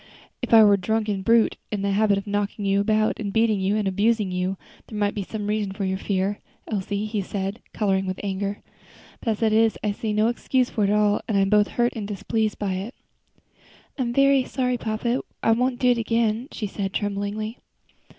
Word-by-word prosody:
"If 245 Hz, -, -4 dB
I 225 Hz, -1 st, +9 dB
were 205 Hz, -1 st, +6 dB
a 200 Hz, -, +2 dB
drunken 210 Hz, 0 st, -1 dB
brute, 230 Hz, +3 st, +3 dB
in 205 Hz, -2 st, -2 dB
the 200 Hz, -, +1 dB
habit 205 Hz, 0 st, +3 dB
of 200 Hz, -, -4 dB
knocking 205 Hz, 0 st, -2 dB
you 195 Hz, 0 st, +2 dB
about, 215 Hz, +1 st, +2 dB, 0.2 s
beating 220 Hz, -3 st, +2 dB
and 210 Hz, -2 st, 0 dB
abusing 205 Hz, +1 st, +1 dB
you, 180 Hz, +1 st, -1 dB, 0.3 s
there 215 Hz, -, -7 dB
might 205 Hz, -1 st, +1 dB
be 205 Hz, -, -3 dB
some 210 Hz, +2 st, -5 dB
reason 210 Hz, -2 st, -1 dB
for 195 Hz, 0 st, -3 dB
your 190 Hz, 0 st, -1 dB
fear, 195 Hz, +1 st, -1 dB, 0.3 s
Elsie," 205 Hz, 0 st, -2 dB
he 215 Hz, -1 st, -2 dB
said, 195 Hz, +2 st, -4 dB
coloring 195 Hz, -3 st, 0 dB
with 185 Hz, 0 st, -3 dB
anger; 200 Hz, +1 st, -3 dB, 0.6 s
"but, -, -, -3 dB
as 220 Hz, +1 st, -1 dB
it 220 Hz, -1 st, +3 dB
is, 225 Hz, 0 st, +3 dB
I 210 Hz, -, +1 dB
see 220 Hz, +1 st, -3 dB
no 215 Hz, +1 st, +2 dB
excuse 250 Hz, +1 st, 0 dB
for 210 Hz, -, +1 dB
it -, -, +1 dB
at 210 Hz, -, +3 dB
all 210 Hz, -1 st, +2 dB
and 215 Hz, -, +1 dB
I -, -, +4 dB
am 195 Hz, +1 st, +1 dB
both 210 Hz, -1 st, +5 dB
hurt 240 Hz, 0 st, +2 dB
and 210 Hz, -3 st, -4 dB
displeased 215 Hz, +1 st, -1 dB
by 200 Hz, -2 st, -2 dB
it." 205 Hz, +7 st, -6 dB, 1.0 s
"I -, -, +1 dB
am 240 Hz, -2 st, 0 dB
very 275 Hz, +1 st, +4 dB
sorry, 250 Hz, -1 st, -1 dB
papa; 230 Hz, +3 st, -1 dB, 0.2 s
I 225 Hz, -, +4 dB
won't 250 Hz, +2 st, +1 dB
do 250 Hz, 0 st, +4 dB
so 235 Hz, -, -3 dB
again," 230 Hz, +1 st, 0 dB
she 215 Hz, -, -4 dB
said, 195 Hz, -1 st, -4 dB
tremblingly. 205 Hz, +2 st, -3 dB
210 Hz, 215 wpm, -24 LUFS, 200-225 Hz, 1.0 s, I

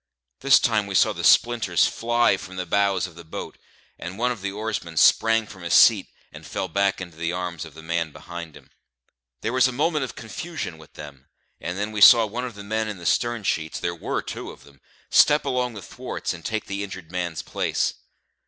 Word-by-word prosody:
This 140 Hz, 0 st, +6 dB
time 110 Hz, -3 st, +1 dB
we 100 Hz, -, -5 dB
saw -, -, +4 dB
the -, -, -6 dB
splinters 115 Hz, -10 st, +4 dB
fly 120 Hz, -2 st, +2 dB
from 95 Hz, 0 st, -9 dB
the 90 Hz, 0 st, -3 dB
bows 100 Hz, 0 st, +1 dB
of 90 Hz, -, -10 dB
the 85 Hz, +1 st, -12 dB
boat, 80 Hz, -, -8 dB, 0.4 s
and 90 Hz, +3 st, -7 dB
one 125 Hz, +2 st, +1 dB
of 120 Hz, -5 st, -6 dB
the 100 Hz, 0 st, -3 dB
oarsmen 105 Hz, -6 st, -4 dB
sprang 115 Hz, +6 st, +4 dB
from 95 Hz, -3 st, -13 dB
his 85 Hz, -, 0 dB
seat -, -, +6 dB, 0.3 s
and -, -, -11 dB
fell -, -, -4 dB
back 100 Hz, +2 st, +1 dB
into 90 Hz, -4 st, -9 dB
the 85 Hz, +1 st, -2 dB
arms 90 Hz, -2 st, -4 dB
of 80 Hz, -2 st, -13 dB
the 80 Hz, -, -11 dB
man 85 Hz, -1 st, -2 dB
behind 85 Hz, 0 st, -9 dB
him. -, -, -20 dB, 0.7 s
There 115 Hz, -, -2 dB
was 130 Hz, 0 st, +4 dB
a -, -, -2 dB
moment 150 Hz, +3 st, 0 dB
of 130 Hz, -, -6 dB
confusion 125 Hz, -, -6 dB
with 80 Hz, -, -16 dB
them, 70 Hz, -3 st, -11 dB, 0.3 s
and 90 Hz, +1 st, -5 dB
then 105 Hz, +2 st, -2 dB
we 105 Hz, -1 st, -4 dB
saw 115 Hz, +1 st, +9 dB
one 120 Hz, +4 st, -4 dB
of 120 Hz, -4 st, -7 dB
the 100 Hz, -, -9 dB
men 110 Hz, +2 st, -2 dB
in 105 Hz, -2 st, -5 dB
the 85 Hz, -, -11 dB
stern 120 Hz, +1 st, 0 dB
sheets 80 Hz, -4 st, -2 dB
(there 85 Hz, -, -2 dB
were 85 Hz, -, -3 dB
two -, -, -6 dB
of -, -, -13 dB
them) 70 Hz, -1 st, -20 dB, 0.3 s
step 150 Hz, 0 st, +5 dB
along 125 Hz, -3 st, -1 dB
the 100 Hz, -, -8 dB
thwarts -, -, -5 dB
and -, -, -11 dB
take 110 Hz, -1 st, -3 dB
the 100 Hz, +1 st, -4 dB
injured 95 Hz, -4 st, -9 dB
man's 90 Hz, -3 st, -3 dB
place. -, -, -1 dB
100 Hz, 220 wpm, -24 LUFS, 85-115 Hz, 0.7 s, saw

